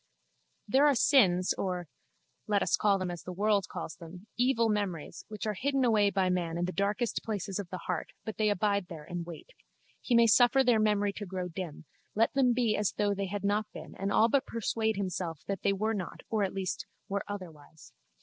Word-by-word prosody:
There 270 Hz, +7 st, +5 dB
are 285 Hz, -, +4 dB
sins 190 Hz, -9 st, +4 dB
or 180 Hz, -3 st, -2 dB, 0.6 s
(let 205 Hz, -1 st, +2 dB
us -, -, +2 dB
call 205 Hz, -2 st, +3 dB
them 185 Hz, -2 st, -3 dB
as 175 Hz, -2 st, -6 dB
the 180 Hz, -, -7 dB
world 200 Hz, +1 st, +1 dB
calls -, -, -6 dB
them) 175 Hz, +3 st, -11 dB
evil 240 Hz, -2 st, +2 dB
memories 200 Hz, -7 st, -3 dB
which 215 Hz, 0 st, -6 dB
are 215 Hz, -, 0 dB
hidden 270 Hz, +5 st, 0 dB
away 215 Hz, -4 st, +4 dB
by 190 Hz, -1 st, +1 dB
man 175 Hz, -2 st, -1 dB
in 175 Hz, -, 0 dB
the 180 Hz, -, -2 dB
darkest 205 Hz, +5 st, -1 dB
places 205 Hz, -3 st, -3 dB
of 195 Hz, -4 st, -5 dB
the 185 Hz, -, -4 dB
heart 180 Hz, -3 st, -2 dB, 0.2 s
but 220 Hz, -, -5 dB
they 215 Hz, -1 st, +2 dB
abide 200 Hz, -1 st, +1 dB
there 160 Hz, -4 st, -8 dB
and 175 Hz, +1 st, -5 dB
wait. 175 Hz, -, -10 dB, 0.5 s
He 245 Hz, -, +1 dB
may 235 Hz, 0 st, +7 dB
suffer 245 Hz, +4 st, +5 dB
their 240 Hz, -3 st, +4 dB
memory 205 Hz, -1 st, +2 dB
to 205 Hz, -, -5 dB
grow 180 Hz, -1 st, -4 dB
dim, 165 Hz, -3 st, -7 dB, 0.3 s
let 225 Hz, +2 st, +2 dB
them 265 Hz, -3 st, +4 dB
be 235 Hz, -3 st, +2 dB
as 210 Hz, -2 st, 0 dB
though 205 Hz, -1 st, +1 dB
they 200 Hz, 0 st, -3 dB
had 205 Hz, +2 st, -4 dB
not 205 Hz, +1 st, 0 dB
been -, -, -9 dB
and 195 Hz, +1 st, -2 dB
all 220 Hz, -, +5 dB
but 275 Hz, +3 st, +1 dB
persuade 220 Hz, -1 st, -1 dB
himself 180 Hz, -5 st, -3 dB
that 195 Hz, -1 st, -3 dB
they 200 Hz, -, +2 dB
were 215 Hz, +3 st, 0 dB
not 190 Hz, -5 st, -5 dB
or 215 Hz, -2 st, +2 dB
at 195 Hz, -, -2 dB
least 190 Hz, -1 st, -3 dB, 0.2 s
were 200 Hz, 0 st, -1 dB
otherwise. 160 Hz, -6 st, -9 dB
200 Hz, 215 wpm, -30 LUFS, 180-220 Hz, 0.6 s, may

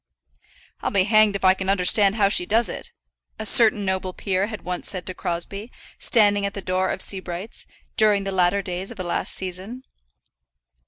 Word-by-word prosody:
"I'll -, -, -1 dB
be 195 Hz, -2 st, +2 dB
hanged 215 Hz, 0 st, +3 dB
if 195 Hz, -, -2 dB
I 185 Hz, -, +6 dB
can 190 Hz, 0 st, -5 dB
understand 195 Hz, +1 st, +4 dB
how 205 Hz, -3 st, +3 dB
she 180 Hz, -3 st, +2 dB
does 230 Hz, +3 st, +2 dB
it," -, -, -7 dB, 0.5 s
a 220 Hz, -, -6 dB
certain 215 Hz, -2 st, +5 dB
noble 190 Hz, -1 st, -2 dB
peer 195 Hz, +1 st, -1 dB
had 215 Hz, -5 st, -8 dB
once 180 Hz, +1 st, -4 dB
said 185 Hz, -3 st, -4 dB
to 185 Hz, -, -1 dB
Crosbie, 195 Hz, +7 st, -4 dB, 0.3 s
standing 205 Hz, -4 st, +2 dB
at 200 Hz, 0 st, -3 dB
the -, -, -4 dB
door 185 Hz, 0 st, -1 dB
of -, -, -1 dB
Sebright's, 190 Hz, +1 st, -5 dB, 0.3 s
during 210 Hz, -2 st, +3 dB
the 195 Hz, -, -4 dB
latter 190 Hz, +1 st, +1 dB
days 185 Hz, +1 st, -5 dB
of 235 Hz, -, -9 dB
the 185 Hz, -, -4 dB
last 175 Hz, -, -2 dB
season. 190 Hz, +7 st, -3 dB
195 Hz, 190 wpm, -22 LUFS, 185-210 Hz, 0.5 s, I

